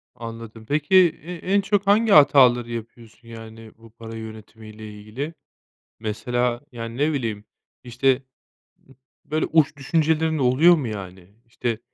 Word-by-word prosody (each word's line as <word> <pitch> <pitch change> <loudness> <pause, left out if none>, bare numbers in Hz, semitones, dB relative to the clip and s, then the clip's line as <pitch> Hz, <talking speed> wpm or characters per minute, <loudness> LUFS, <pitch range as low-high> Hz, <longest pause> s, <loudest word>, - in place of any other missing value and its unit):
Anladım. 115 -1 -9
Peki, 150 +8 0 0.3
e 180 +2 -7
en 190 +4 0
çok 200 0 -1
hangi 215 +1 +3
hataları 125 -6 +5
yapıyorsun, 115 0 -10
yani, 115 -1 -11
bu 115 0 -17
para 115 0 -11
yönetimi 110 0 -10
ile 110 0 -10
ilgili? 130 +10 -6 0.7
Mesela, 120 +3 -2
yani, 115 0 -7
ne 150 +2 +1
bileyim, 110 -6 -4 0.4
işte, 130 +2 0 0.7
ı 135 - -19 0.3
böyle, 155 +1 -1
uç 150 -2 +2
düşüncelerin 160 +2 0
oluyor 140 +7 +5
mu 140 -7 -3
yani? 95 -2 -9
İşte, 115 -1 -3
120 Hz, 135 wpm, -23 LUFS, 110-150 Hz, 0.7 s, hataları